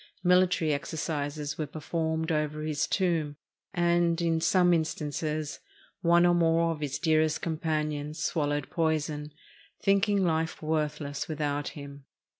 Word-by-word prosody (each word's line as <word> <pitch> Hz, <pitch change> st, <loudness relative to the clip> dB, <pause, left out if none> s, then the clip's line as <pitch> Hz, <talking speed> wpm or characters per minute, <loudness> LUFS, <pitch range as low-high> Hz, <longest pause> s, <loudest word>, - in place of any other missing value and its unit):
Military 180 Hz, -3 st, +3 dB
exercises 145 Hz, -1 st, -3 dB
were 155 Hz, -, -1 dB
performed 160 Hz, +2 st, -2 dB
over 150 Hz, -1 st, -1 dB
his 155 Hz, -1 st, -1 dB
tomb, 165 Hz, -6 st, 0 dB, 0.4 s
and, 175 Hz, -2 st, +2 dB
in 165 Hz, -1 st, +1 dB
some 180 Hz, +1 st, +4 dB
instances, 155 Hz, -1 st, -2 dB, 0.4 s
one 170 Hz, 0 st, +5 dB
or 175 Hz, -, +5 dB
more 165 Hz, -1 st, +3 dB
of 160 Hz, -, -4 dB
his 145 Hz, -2 st, -2 dB
dearest 155 Hz, -1 st, +2 dB
companions 155 Hz, -2 st, -2 dB
swallowed 145 Hz, -3 st, -1 dB
poison, 155 Hz, -2 st, -1 dB, 0.5 s
thinking 200 Hz, 0 st, +3 dB
life 160 Hz, -1 st, 0 dB
worthless 150 Hz, -2 st, -2 dB
without 145 Hz, -2 st, -2 dB
him. 140 Hz, -1 st, -10 dB
155 Hz, 120 wpm, -28 LUFS, 150-170 Hz, 0.5 s, one